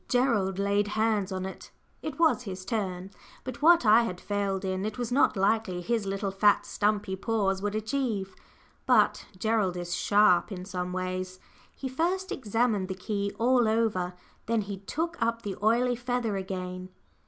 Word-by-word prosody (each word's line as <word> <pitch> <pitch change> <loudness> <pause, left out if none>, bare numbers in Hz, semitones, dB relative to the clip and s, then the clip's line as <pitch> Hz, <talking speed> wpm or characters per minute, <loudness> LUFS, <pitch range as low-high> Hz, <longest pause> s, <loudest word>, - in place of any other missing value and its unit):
Gerald 230 -7 +2
laid 200 +1 +1
hands 215 -3 +1
on 185 0 -3
it. 190 - -8 0.3
It 305 -4 -5
was 325 -6 +3
his 185 -5 -7
turn, 190 -5 -3 0.3
but 255 0 -7
what 335 -3 +6
I 220 +2 +7
had 185 -6 -3
failed 200 -1 -2
in, 190 0 -2
it 215 0 -3
was 245 -1 -3
not 245 -4 +3
likely 195 -2 +1
his 220 +2 -1
little, 195 0 -2
fat, 205 +1 +3
stumpy 205 -2 0
paws 195 -2 0
would 205 +1 -2
achieve. 215 -4 -2 0.5
But - - +3
Gerald 210 -3 +1
is 175 0 -4
sharp 205 0 +3
in 180 -2 -6
some 180 -2 -4
ways. 185 0 -4 0.4
He 270 - -5
first 355 +8 -1
examined 225 -4 0
the 190 - -4
key 200 +1 -2
all 245 0 +3
over. 215 -5 0 0.3
Then 230 -1 +1
he 200 -1 -5
took 325 - -4
up 230 0 0
the 200 -2 -4
oily 240 +3 +3
feather 245 -3 -2
again. 185 -1 -5
205 Hz, 165 wpm, -28 LUFS, 190-230 Hz, 0.5 s, I